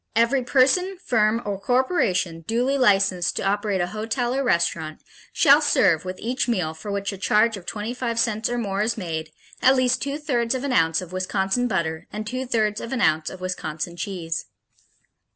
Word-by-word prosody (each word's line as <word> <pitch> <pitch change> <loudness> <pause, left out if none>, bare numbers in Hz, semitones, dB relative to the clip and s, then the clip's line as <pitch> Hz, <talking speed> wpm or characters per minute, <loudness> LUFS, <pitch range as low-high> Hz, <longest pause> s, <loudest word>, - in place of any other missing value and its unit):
_ - - -55
Every 235 +4 +3
person, 290 +10 +2
firm 225 0 +2
or 200 -2 -3
corporation 200 - 0
duly 245 +4 +1
licensed 195 -8 +2
to - - -2
operate 200 -1 0
a - - +1
hotel 230 +3 -2
or 275 +1 0
restaurant 170 -7 0 0.3
shall 290 -1 +5
serve 185 - +3
with 185 0 -5
each 250 +2 -2
meal 180 -10 0
for 160 +6 -9
which 200 0 -2
a 195 - -9
charge 215 +3 +3
of 190 -3 -11
twenty 215 +3 -4
five 240 -2 -3
cents 220 -2 0
or 240 - -2
more 200 -4 -2
is 225 +2 0
made, 160 -5 -4 0.3
at 260 +1 +5
least 255 -1 +2
two 280 +1 -2
thirds 250 -5 -1
of 260 - -3
an 280 -2 -1
ounce 165 -2 +2
of 180 -1 -9
Wisconsin 190 +5 0
butter 160 -6 -2
and 215 +1 -5
two 255 +3 -4
thirds 215 -3 0
of 230 - -7
an 265 - -1
ounce 155 -7 +2
of 185 - -10
Wisconsin 170 -2 -4
cheese. 170 -2 -4
215 Hz, 195 wpm, -23 LUFS, 185-250 Hz, 0.3 s, shall